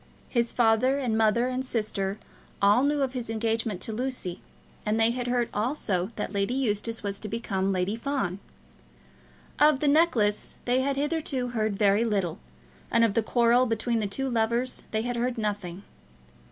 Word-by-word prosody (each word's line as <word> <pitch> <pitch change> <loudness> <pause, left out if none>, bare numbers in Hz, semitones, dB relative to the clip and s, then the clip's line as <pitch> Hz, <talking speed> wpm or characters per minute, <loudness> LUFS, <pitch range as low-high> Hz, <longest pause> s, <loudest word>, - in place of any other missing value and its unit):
His 235 -2 +1
father 240 +3 +3
and 250 -5 -1
mother 225 +2 +3
and 255 0 -2
sister 210 -5 -2 0.4
all 205 +4 +5
knew 285 0 +2
of 265 -1 -2
his 245 -3 -5
engagement 225 -3 -1
to 220 - -3
Lucy, 245 -7 -3 0.4
and 215 +1 0
they 225 +1 +4
had 245 0 -3
heard 245 -1 +1
also 210 -5 -1
that 210 - -4
Lady 200 +5 0
Eustace 230 -3 -1
was 200 -1 -3
to 215 - -6
become 195 -3 -1
Lady 185 +2 0
Fawn. 230 -7 -2 1.2
Of 300 -2 +5
the 295 - +1
necklace 280 -9 +2
they 250 +1 +2
had 275 +1 -1
hitherto 285 -4 -1
heard 215 -4 -1
very 205 +1 +3
little, 200 -7 -1 0.5
and 230 - +3
of 225 -3 +3
the 230 - +2
quarrel 240 +2 +3
between 230 +1 0
the 210 - -1
two 270 +7 -3
lovers 235 +1 0
they 220 0 -1
had 245 0 -2
heard 245 +1 -1
nothing. 205 -4 -3
230 Hz, 170 wpm, -27 LUFS, 210-255 Hz, 1.2 s, all